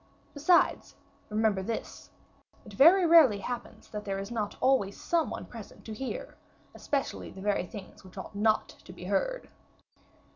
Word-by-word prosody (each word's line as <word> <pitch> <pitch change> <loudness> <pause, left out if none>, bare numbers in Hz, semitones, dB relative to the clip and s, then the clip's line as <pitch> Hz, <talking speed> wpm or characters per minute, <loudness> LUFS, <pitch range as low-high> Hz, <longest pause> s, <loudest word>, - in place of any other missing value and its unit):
Besides, 340 +5 +2 0.3
remember 215 -2 +1
this: 225 +4 -5 0.6
it 210 - -12
very 340 - +7
rarely 320 -10 +7
happens 235 +5 -6
that 210 -1 -6
there 195 -1 -3
is 195 +3 -6
not 215 -3 -3
always 255 -7 +2
some 335 -2 0
one - - -6
present 225 -4 -12
to 220 - -6
hear, 270 - -6 0.4
especially 280 -2 -3
the - - -12
very 200 -3 0
things 200 0 -11
which 185 +1 -15
ought 190 - -7
not 215 +2 +2
to - - -14
be - - -11
heard." - - -1
220 Hz, 155 wpm, -29 LUFS, 200-295 Hz, 0.6 s, very